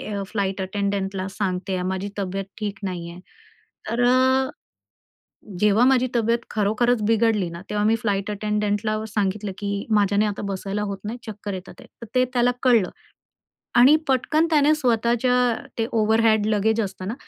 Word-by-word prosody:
A 200 - -2
flight 195 -2 -2
अटेंडंटला 195 -1 -2
सांगत 190 -1 -3
आहे, 185 -1 -1
माझी 190 +2 -4
तब्येत 195 0 -3
ठीक 205 -2 -4
नाहीये. 175 -2 -5 0.7
तर 235 +2 0
अ, 260 +1 +3 1.1
जेव्हा 210 +3 +4
माझी 255 -1 +3
तब्येत 230 0 +2
खरोखरच 220 +3 +1
बिघडली 220 -4 +2
ना, 170 +1 -8
तेव्हा 210 0 0
मी 220 +1 +4
फ्लाइट 200 -3 -1
अटेंडंटला 210 +1 -1
सांगितलं, 205 -1 -2
की 200 -1 -3
माझ्याने 205 0 +3
आता 205 -1 -3
बसायला 195 +1 -3
होत 195 - -4
नाही, 225 +3 -4
चक्कर 205 -1 -6
येत 185 0 -7
आहेत. 255 -2 -14
तर 235 - -8
ते 255 - +5
त्याला 245 0 +3
कळलं 235 -8 +4 0.9
आणि 270 +5 +7
पटकन 305 +5 +2
त्याने 300 -1 +4
स्वतःच्या 240 -2 +1 0.4
ते 225 - +1
ओव्हरहॅड 220 -1 +3
लगेज 220 +1 +1
असता 195 -3 -4
ना, 205 +5 -3
210 Hz, 155 wpm, -23 LUFS, 195-235 Hz, 1.1 s, आणि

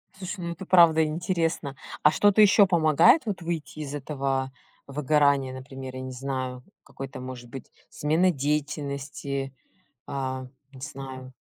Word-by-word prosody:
Слушай, 190 +1 -6
ну 170 - -3
это 185 +3 -9
правда 165 -3 +6
интересно. 165 -2 -1 0.3
А 150 - +7
что-то 205 +4 +4
ещё 205 0 +7
помогает 170 - +5
вот 200 -4 -3
выйти 165 -2 -4
из 145 -2 -5
этого 135 -2 -2 0.4
выгорания? 140 -1 +2
Например, 130 0 -8
я 130 - -5
не 130 - -6
знаю, 130 -1 -4 0.2
какой-то 135 -1 -8
может 125 -1 -8
быть 130 +1 -9 0.2
смена 165 +5 +2
деятельности? 140 -2 -3 0.5
А 130 -1 -4 0.3
не 130 - -13
знаю. 130 -2 -8
140 Hz, 135 wpm, -26 LUFS, 130-160 Hz, 0.5 s, А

